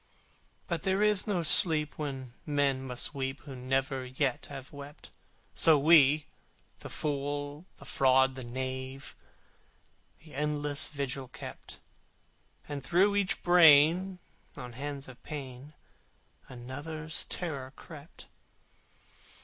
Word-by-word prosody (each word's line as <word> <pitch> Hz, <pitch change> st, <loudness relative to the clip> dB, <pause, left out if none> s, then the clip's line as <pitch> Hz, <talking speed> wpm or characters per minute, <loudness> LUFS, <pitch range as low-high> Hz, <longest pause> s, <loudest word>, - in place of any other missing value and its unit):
But 170 Hz, -3 st, -2 dB
there 195 Hz, +1 st, +1 dB
is 210 Hz, -2 st, +3 dB
no 185 Hz, -5 st, 0 dB
sleep 155 Hz, -2 st, +4 dB
when 135 Hz, -5 st, -5 dB
men 145 Hz, -3 st, +1 dB
must 130 Hz, +2 st, -3 dB
weep 135 Hz, -1 st, -4 dB
Who 140 Hz, -3 st, -9 dB
never 135 Hz, +1 st, -1 dB
yet 130 Hz, 0 st, -2 dB
have 135 Hz, -1 st, -10 dB
wept: 145 Hz, +1 st, -11 dB, 0.4 s
So 160 Hz, -2 st, +6 dB
we 150 Hz, -1 st, +5 dB, 0.5 s
the -, -, -9 dB
fool, 145 Hz, +2 st, -3 dB
the -, -, -14 dB
fraud, 130 Hz, 0 st, +3 dB
the 130 Hz, -1 st, -8 dB
knave 130 Hz, +2 st, -5 dB, 1.1 s
That 155 Hz, -, -14 dB
endless 145 Hz, 0 st, 0 dB
vigil 140 Hz, -2 st, -4 dB
kept, 130 Hz, -, -10 dB, 0.9 s
And 145 Hz, -2 st, -5 dB
through 190 Hz, +7 st, +3 dB
each 200 Hz, -2 st, -1 dB
brain 175 Hz, +2 st, +6 dB, 0.4 s
on 125 Hz, -4 st, -8 dB
hands 140 Hz, +2 st, -6 dB
of 130 Hz, -2 st, -13 dB
pain 140 Hz, 0 st, -8 dB, 0.7 s
Another's 145 Hz, +6 st, -5 dB
terror 140 Hz, -7 st, -4 dB
crept. 155 Hz, 0 st, -13 dB
145 Hz, 115 wpm, -30 LUFS, 130-155 Hz, 1.1 s, So